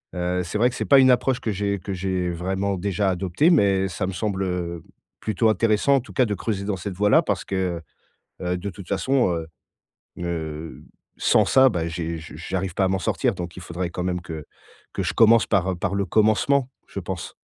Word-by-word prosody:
heu, 90 0 -1
c'est 90 +4 -3
vrai 120 +3 +4
que 125 - -8
c'est - - -3
pas 140 -1 +6
une 130 -1 +6
approche 125 +1 +2
que 110 - -2
j'ai 100 0 -1
que 100 +2 -5
j'ai 90 -1 -1
vraiment 95 +3 -2
déjà 100 +1 0
adoptée 95 - +1
mais 100 - +3
ça 95 +1 -3
me 95 - -4
semble, 95 0 -2
heu, 85 -3 -3 0.4
plutôt 110 +1 +1
intéressant 110 +6 +3
en - - +4
tout 125 - -12
cas 130 - +3
de 105 - -2
creuser 100 0 -3
dans 100 -2 -1
cette 95 +1 -5
voie-là 105 +2 +4
parce - - -2
que, 90 -3 -2 0.6
heu, 90 0 -1
de 100 +3 -4
toute 95 0 -11
façon, 125 +2 +1
heu 80 -1 -4 0.8
heu, 80 -2 -5 0.3
sans - - +3
ça, 130 0 +5
bah, 85 -8 -2
j'ai 85 0 -4
je 80 0 -11
j'arrive 90 +1 -3
pas 95 - +1
à - - +2
m'en 95 0 0
sortir 120 +2 0
donc 85 -1 -6
il 90 - -8
faudrait 85 +1 -4
quand 90 - -4
même 90 -1 -1
que 80 -4 -7 0.5
que - - -2
je - - -1
commence 115 0 +6
par 95 -2 +1
par 100 +2 -1
le 100 0 0
commencement, 120 +6 +2 0.2
je - - -5
pense. - - -6
95 Hz, 215 wpm, -23 LUFS, 90-105 Hz, 0.8 s, pas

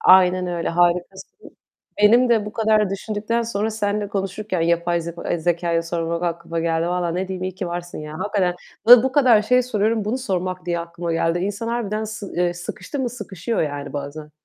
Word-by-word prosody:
Aynen 185 0 +5
öyle. 175 -1 -2
Harikasın. 175 - -1 0.5
Benim 240 +4 +6
de 220 -3 +2
bu 210 - -6
kadar 215 -3 +2
düşündükten 215 +3 -2
sonra 220 -1 -1
seninle 205 -1 -1
konuşurken 195 -1 -3
yapay 170 +1 +1
zeko 170 +1 -7 0.2
zekâya 170 0 0
sormak 170 0 -2
aklıma 170 -1 -2
geldi. 165 0 0
Vallahi 175 -1 -1
ne 185 +1 -2
diyeyim, 185 -1 -4
iyi 185 - -4
ki 185 -1 -4
varsın 175 0 -5
ya. 150 0 -7
Hakikaten. 195 -4 0 0.3
Bu 245 +2 +8
kadar 250 -7 +5
şey 250 +3 +3
soruyorum 220 -2 0
bunu 225 +5 -1
sormak 185 -6 -3
diye 170 -1 0
aklıma 170 0 -4
geldi. 165 +1 +1
İnsan 205 +4 -3
harbiden 220 -2 -2
sı 215 -2 -7
eee, 175 0 +1
sıkıştı 185 +9 -6
mı 250 -3 -1
sıkışıyor 210 -2 -3
yani 145 -1 -4
bazen. 145 +1 -6
185 Hz, 180 wpm, -22 LUFS, 170-215 Hz, 0.5 s, Bu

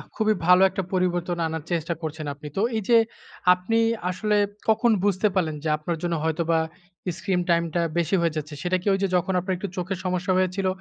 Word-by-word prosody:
খুবই 215 -1 +2
ভালো 180 +1 +6
একটা 195 - -3
পরিবর্তন 175 -1 0
আনার 160 -1 -4
চেষ্টা 170 0 0
করছেন 155 -1 -5
আপনি। 145 +1 -10
তো - - +2 0.2
এই - - -1
যে, 235 - +7 0.6
আপনি 180 +5 -1 0.3
আসলে 210 +3 0 0.3
কখন 225 +2 +4
বুঝতে 200 +1 +2
পারলেন 160 -5 +1
যে, 155 - -1
আপনার 165 +2 -3
জন্য 170 -1 0
হয়তোবা 165 0 +1 0.6
স্ক্রিন 185 -2 0
টাইমটা 170 0 +2 0.2
বেশি 170 +3 +2
হয়ে 165 -2 0
যাচ্ছে, 150 0 -5
সেটা 185 +1 +1
কি 190 - -7
ওই 195 - 0
যে, - - +3
যখন 180 +2 +1
আপনার 185 +1 -2
একটু 195 +2 -5
চোখের 185 +1 -2
সমস্যা 185 +1 0
হয়েছিল, 185 +1 0
180 Hz, 195 wpm, -25 LUFS, 165-190 Hz, 0.6 s, যে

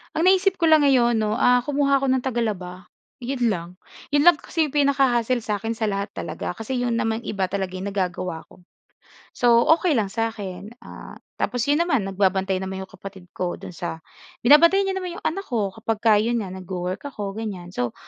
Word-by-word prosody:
Ang 330 +4 +4
naisip 380 -1 +2
ko 330 - +4
lang 310 -2 +6
ngayon 240 -4 +4
'no, 215 -1 0
ah, 245 +2 +3
kumuha 280 -1 +2
ako 275 - -1
ng 260 -1 +2
tagalaba. 205 -7 -3 0.3
'Yon 250 -2 -1
lang. 170 -4 -3 0.4
'Yon 290 - +4
lang 350 - +9
kasi 330 - -3
'yong 295 - -11
pinaka-hassle 260 -4 +2
sa 210 -1 -2
'kin 225 +3 -3
sa 220 -1 -2
lahat 200 0 -3
talaga. - - -5
Kasi 225 +6 -4
'yon 245 -1 0
naman 225 +1 -2
iba 190 -3 -2
talaga 190 -1 -3
ay 190 - -4
nagagawa 180 -3 -3
ko. - - -20 0.7
So, 235 -1 +4 0.2
okey 350 -4 +1
lang 210 -6 0
sa'kin. 210 -2 -4
Ah, - - -11 0.2
tapos 245 -2 -1
'yon 290 - +3
naman 290 - +1
nagbabantay 190 -1 0
naman 190 0 -5
'yong 190 - -11
kapatid 190 -3 -11
ko 180 -1 -3
do'n - - -9
sa 170 -2 -6 0.4
binabantayan 335 +9 +6
niya - - -2
naman 365 -2 -5
'yong - - -10
anak 385 +5 -2
ko 215 -6 -1
kapag 220 +1 -4 0.2
'yon 235 -1 0
nga 190 - -7
nagwo-work 185 +3 -5
ako 210 -8 -5
ganyan. 190 -6 -6
So 125 -9 -3
225 Hz, 195 wpm, -23 LUFS, 190-275 Hz, 0.7 s, lang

